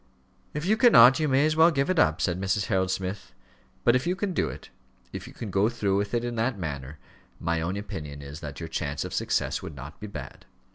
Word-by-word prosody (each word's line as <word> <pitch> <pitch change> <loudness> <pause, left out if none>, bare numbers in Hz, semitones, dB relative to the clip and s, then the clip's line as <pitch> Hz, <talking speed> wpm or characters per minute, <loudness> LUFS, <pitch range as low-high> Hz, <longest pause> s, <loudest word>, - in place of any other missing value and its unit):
"If 150 +2 -3
you 215 +4 +3
cannot, 135 - +7
you 155 - +1
may 135 +1 +3
as 155 0 +1
well 160 +1 +7
give 140 -4 0
it 185 -3 +1
up," 80 0 +3
said 90 +1 0
Mrs. 95 +1 0
Harold 95 -4 +1
Smith. 95 +1 -4 0.5
"But 120 - +5
if 130 +5 0
you 180 - +1
can 195 -1 -2
do - - 0
it - - -10 0.4
if - - -6
you - - -12
can 110 -4 -6
go 100 +4 +3
through 100 -5 0
with 100 +3 -1
it 120 - 0
in 120 - -3
that 115 0 0
manner 70 -4 -5 0.4
my 85 0 -1
own 90 +4 -2
opinion 75 -8 -7
is 70 +2 -8
that 75 -4 -7
your 80 - -5
chance 75 -3 -3
of - - -6
success - - 0
would 75 - -8
not 70 +3 -10
be 105 - -7
bad. 75 -10 -9
100 Hz, 240 wpm, -27 LUFS, 80-130 Hz, 0.5 s, cannot